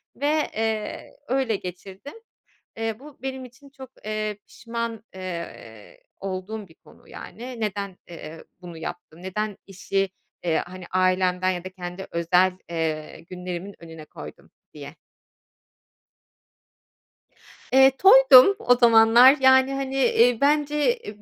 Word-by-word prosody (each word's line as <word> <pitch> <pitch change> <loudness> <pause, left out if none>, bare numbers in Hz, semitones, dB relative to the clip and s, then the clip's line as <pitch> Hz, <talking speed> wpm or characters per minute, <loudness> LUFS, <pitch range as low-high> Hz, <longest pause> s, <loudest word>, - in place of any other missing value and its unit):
ve, 300 +2 0
eee, 220 -1 -4
öyle 260 -4 0
geçirdim. 190 +7 -9 0.6
Eee, 225 -1 -3
bu 290 +1 -15
benim 265 -1 -5
için 255 +3 -16
çok, 265 -2 -12
eee, 215 -1 -3
pişman, 230 -1 -6
eee, 170 - -9 0.2
olduğum 195 +2 -6
bir 160 - -20
konu - - -22
yani. 245 0 -9
Neden, 200 -3 -4
eee, 165 -1 -10 0.2
bunu 175 -2 -10
yaptı, 175 0 -8
neden 205 +2 -4
işi, 195 0 -2 0.3
eee, 165 -2 +1
hani, 185 0 -10
ailemden 185 0 +1
ya 180 -1 -4
da - - -5
kendi 180 0 -8
özel, 180 +2 +2 0.2
eee, 160 -2 -4
günlerimin 180 +2 -7
önüne 160 -2 -11
koydum 75 - -12 0.2
diye. 145 0 -10 2.8
Eee, 265 0 +7
toydum 270 +1 +8
o 245 - +3
zamanlar, 235 +3 +6
yani, 265 +1 +5
hani, 270 0 -4
eee, 245 -2 +3
bence, 295 - +2
eee, 210 - -11
210 Hz, 120 wpm, -24 LUFS, 180-255 Hz, 2.8 s, toydum